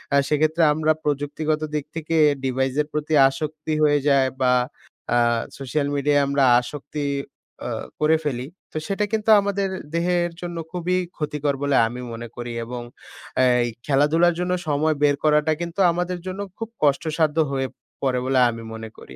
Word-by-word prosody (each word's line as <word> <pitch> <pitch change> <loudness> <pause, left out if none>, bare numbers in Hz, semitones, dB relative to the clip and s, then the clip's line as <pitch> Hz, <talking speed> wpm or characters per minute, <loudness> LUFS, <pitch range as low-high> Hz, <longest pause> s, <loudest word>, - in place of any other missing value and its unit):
আ - - +6
সেক্ষেত্রে 155 +2 +2
আমরা 155 +1 +2
প্রযুক্তিগত 150 +2 -1
দিক 150 -2 -1
থেকে 165 0 -2 0.3
ডিভাইসের 135 +3 0
প্রতি 150 +1 -2 0.2
আসক্তি 155 +2 -4
হয়ে 145 -1 +4
যায় 135 -2 +4
বা 125 -1 +4 0.6
আ - - +4 0.4
সোশ্যাল 140 +2 -1
মিডিয়ায় 145 0 +3
আমরা 140 0 +2 0.2
আসক্তি 145 +3 -6 1.0
করে 155 +1 +4
অ - - -13
ফেলি 130 -3 -2 0.2
তো - - -5
সেটা 200 +1 0
কিন্তু 220 0 0
আমাদের 200 0 -1 0.3
দেহের 175 0 +1
জন্য 175 -1 -5
খুবই 180 0 -1 0.2
ক্ষতিকর 150 -2 -1
বলে 140 -1 +2
আমি 125 +2 -6
মনে 115 +1 -6
করি। 120 0 -5
এবং 120 +1 -6 0.8
এই 120 - +1 0.2
খেলাধুলার 150 +5 +3
জন্য 180 0 -1 0.2
সময় 155 +1 +1
বের 145 -1 +4
করাটা 150 0 +3
কিন্তু 170 +2 -5
আমাদের 180 +1 -2
জন্য 185 +1 -5 0.2
খুব 225 -1 -5
কষ্টসাধ্য 155 +2 +1
হয়ে 135 -1 -2 0.3
পড়ে 130 -2 +1
বলে 130 0 +2
আমি 115 -1 -6
মনে 110 0 -7
করি। 65 - -12
150 Hz, 155 wpm, -23 LUFS, 135-165 Hz, 1.0 s, আ